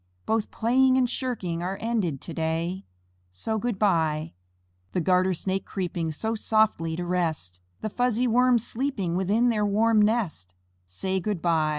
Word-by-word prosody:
Both 220 -1 0
playing 260 +3 +3
and 255 -1 +3
shirking 225 -10 -3
Are 185 +2 -3
ended 210 - -1
to 170 - -7
day, 165 +4 -2 0.4
So, 155 - -3
"Good 235 -2 -2
by." 160 - +1 0.6
The - - +1
Garter 185 +1 +2
Snake 190 +2 -2
creeping 175 -3 -3
So 220 +9 -2
softly 215 -7 +1
to 175 +1 -4
rest, 160 - -2 0.2
The 215 - -2
fuzzy 245 +1 +1
Worms 245 -1 +3
sleeping 225 -9 -2
Within 205 +6 +2
their 215 -3 +1
warm 215 +2 +3
nest, 205 - 0 0.3
Say, 190 - -2
"Good 205 0 -2
by." 160 -2 +2
195 Hz, 155 wpm, -26 LUFS, 170-225 Hz, 0.6 s, playing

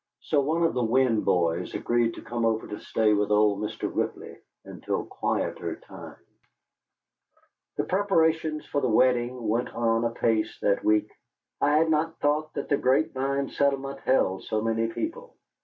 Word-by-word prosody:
So 150 - +1
one 160 +5 0
of 165 - +2
the 125 - 0
Winn 115 -1 +2
boys 85 0 0
agreed 120 -1 0
to - - -10
come 120 0 -3
over 110 -1 +1
to 105 - -6
stay 110 -1 +1
with 105 0 +1
old 105 -1 +3
Mr. 105 +1 -3
Ripley - - -3 0.3
until - - -4
quieter - - -2
times. - - -12 1.6
The - - +1
preparations 160 -5 +1
for 145 - -2
the 130 - +1
wedding 120 0 +2
went 115 +3 0
on 115 0 +1
apace 115 -2 0
that 100 - +2
week. 105 0 +2 0.5
I 145 +1 +4
had 160 +1 +3
not 160 +1 0
thought 150 +1 0
that - - -3
the 145 - +2
Grape 135 +5 +2
Vine 140 +1 -1
settlement 140 -1 -1
held 95 -8 +1
so 110 - -1
many 115 +1 0
people. 450 - -5
125 Hz, 160 wpm, -26 LUFS, 110-145 Hz, 1.6 s, I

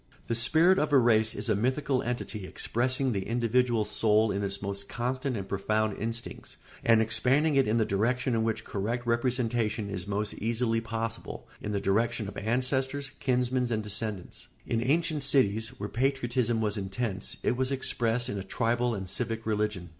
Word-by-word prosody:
] - - -29
The - - +2
spirit 160 +11 +4
of 150 - 0
a 140 - +6
race 110 -3 +4
is - - -3
a 110 - +3
mythical 130 +4 0
entity 115 -5 -4
expressing 130 +5 0
the 95 -4 -2
individual 120 -1 +2
soul 110 0 +2
in 100 - -1
its 100 0 -1
most 100 0 -4
constant 130 +1 -2
and 95 -1 -5
profound 105 +1 0
instincts 115 +2 -4 0.3
and 115 -1 +5
expanding 130 +7 +2
it 135 -3 +4
in 110 +2 +2
the 110 - +3
direction 125 +6 0
in 110 -1 +1
which 110 0 -1
correct 115 +5 -3
representation 120 -3 0
is 90 -1 -4
most 105 +1 -1
easily 115 +1 0
possible, 115 0 -5
in 105 - -4
the 100 - 0
direction 110 +3 0
of 100 - -8
ancestors, 130 +5 0
kinsmen, 125 -2 +1
and 110 -1 0
descendants. 105 -2 -3 0.2
In 115 -1 0
ancient 155 +3 +1
cities, 110 -6 +2
where 100 - -3
patriotism 120 -2 0
was 105 -1 0
intense, 100 +1 -3
it - - +2
was 130 +1 0
expressed 120 -3 0
in 105 -6 -3
a - - -5
tribal 120 +3 0
and 95 -2 -5
civic 115 +3 -2
religion. 105 -4 -1
115 Hz, 175 wpm, -29 LUFS, 105-125 Hz, 0.3 s, a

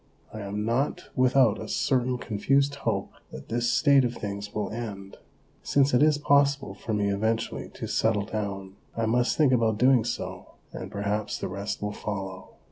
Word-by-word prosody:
I 110 - -6
am 105 +1 -3
not 125 +6 -1
without 130 -4 +4
a - - -6
certain 125 -2 +1
confused 135 +6 +1
hope 140 - -2 0.2
that 65 - -10
this 120 +1 0
state 140 -1 +5
of 120 -1 -1
things 100 0 -5
will 105 -1 -3
end. 105 -4 -6 0.4
Since 140 -1 +2
it 125 - +4
is 150 -1 +5
possible 140 -1 +2
for - - -6
me 105 -1 +1
eventually 110 +3 -1
to - - -5
settle 105 -3 +1
down, 100 -3 -5 0.2
I 115 - +1
must 120 +2 +1
think 145 -4 +4
about 115 -3 +2
doing 125 0 +5
so, 120 - -5 0.2
and - - -6
perhaps 105 +1 -2
the - - -4
rest 100 +2 -4
will 105 0 -2
follow. 95 -3 -5
110 Hz, 175 wpm, -27 LUFS, 100-130 Hz, 0.4 s, state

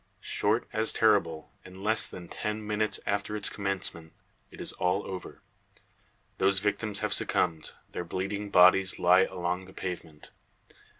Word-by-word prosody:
Short 110 +4 +1
as 110 0 +4
terrible; 100 -8 +2
in 95 +1 -12
less 110 +2 +2
than 90 -1 -9
ten 105 0 -4
minutes 105 0 0
after 100 +1 -1
its 105 -1 -1
commencement 95 -5 -3 0.4
it - - -14
is - - +1
all 90 +3 0
over. 95 -1 -8 1.0
The 95 +1 +4
victims 105 +1 -1
have - - 0
succumbed, 80 -2 0 0.2
their - - -4
bleeding 95 +4 -4
bodies 95 0 +5
lie 90 +2 +5
along 90 0 -3
the 95 - -14
pavement. 85 -5 -7
95 Hz, 140 wpm, -29 LUFS, 90-105 Hz, 1.0 s, bodies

